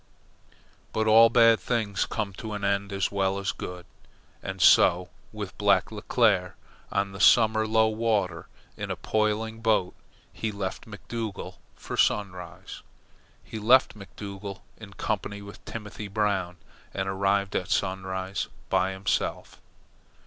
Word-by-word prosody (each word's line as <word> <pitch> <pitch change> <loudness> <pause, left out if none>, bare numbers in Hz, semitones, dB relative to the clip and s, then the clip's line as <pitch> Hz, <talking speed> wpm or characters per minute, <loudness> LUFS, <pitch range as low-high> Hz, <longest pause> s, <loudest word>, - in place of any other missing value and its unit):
But 110 - 0
all 115 +1 +7
bad 115 -1 +5
things 110 -5 -1
come 105 -4 -3
to 110 +3 -7
an 105 -1 -5
end 100 0 0
as 95 -1 -1
well 95 -1 0
as 100 0 -1
good, 90 -1 -8 0.6
and - - -6
so 90 +1 +5 0.2
with - - -7
Black - - +3
Leclere. 100 -7 +1 0.4
On 100 0 0
the 100 - -9
summer 110 -1 +5
low 110 0 +4
water, 110 -7 -1 0.3
in - - -5
a - - -2
poling 110 +1 -1
boat, 110 -5 +2 0.4
he 110 - -3
left 100 0 -5
McDougall 110 0 -6 0.2
for - - -7
Sunrise. 95 -3 -1 0.6
He 110 - -7
left 125 +5 +5
McDougall 100 0 -8 0.2
in 105 -3 -11
company 100 -1 -3
with 100 0 -12
Timothy 105 -1 -7
Brown, 100 -4 -1 0.4
and 95 0 -2
arrived 100 0 0
at 90 - -1
Sunrise 95 0 -2 0.2
by 95 +1 +2
himself. 95 0 -2
100 Hz, 135 wpm, -27 LUFS, 95-110 Hz, 0.6 s, all